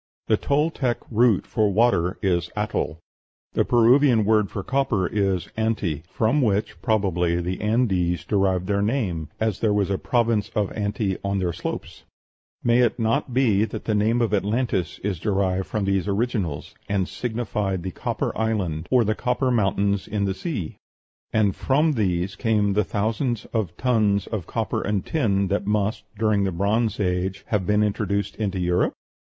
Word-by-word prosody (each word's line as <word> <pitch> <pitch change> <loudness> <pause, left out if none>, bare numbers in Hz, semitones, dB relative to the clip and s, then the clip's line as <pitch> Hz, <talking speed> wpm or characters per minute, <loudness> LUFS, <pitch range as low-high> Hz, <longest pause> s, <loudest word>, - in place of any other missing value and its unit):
The - - +3
Toltec 140 -4 0
root 115 -3 +3
for 105 -3 +1
water 100 -4 +2
is 90 -3 +1
Atl; 105 -6 -1 0.6
the - - +2
Peruvian 120 -1 +4
word 105 -2 +3
for 100 - -5
copper 130 -7 0
is 95 -2 0
Anti 110 -9 -1
(from 115 +9 +1
which, 105 -6 0
probably, 90 -5 +1
the 90 +2 -3
Andes 95 - +1
derived 95 -3 +1
their 100 +1 0
name, 100 - -1
as 110 -3 0
there 105 -2 +2
was 100 -1 +1
a 95 - 0
province 115 -4 +1
of 105 -2 0
Anti 100 -2 -2
on 100 0 -1
their 90 -3 -1
slopes): - - -6 0.6
may 120 0 +4
it 120 -2 +2
not 125 +4 0
be 115 -5 +3
that 110 - -5
the 110 - 0
name 110 +3 +2
of 110 -3 -1
Atlantis 105 -3 0
is 95 -4 -2
derived 95 -1 0
from 105 -3 -2
these 95 -2 0
originals, 100 - -2 0.2
and 95 -3 0
signified 105 -6 -3
the 95 - -4
copper - - -3
island, 95 -8 -1
or 125 -2 +4
the 110 0 +1
copper 125 +3 0
mountains 100 -3 +1
in 105 -1 -1
the 95 - 0
sea? 110 - -4 0.5
And 105 -4 +2
from 150 +4 +2
these 95 -6 0
came 105 -3 +1
the 105 +2 +2
thousands 110 +4 -1
of 100 -7 -2
tons 105 -6 +2
of 105 -7 -5
copper - - -2
and 105 -2 -1
tin 100 -10 +1
that 100 0 -1
must, 105 +1 0
during 105 -2 +2
the 95 - 0
Bronze 105 +6 0
Age, 95 0 -1
have 100 -5 0
been 105 0 +3
introduced 100 -1 -1
into 100 -3 -2
Europe? 90 0 +1
105 Hz, 165 wpm, -24 LUFS, 95-115 Hz, 0.6 s, Peruvian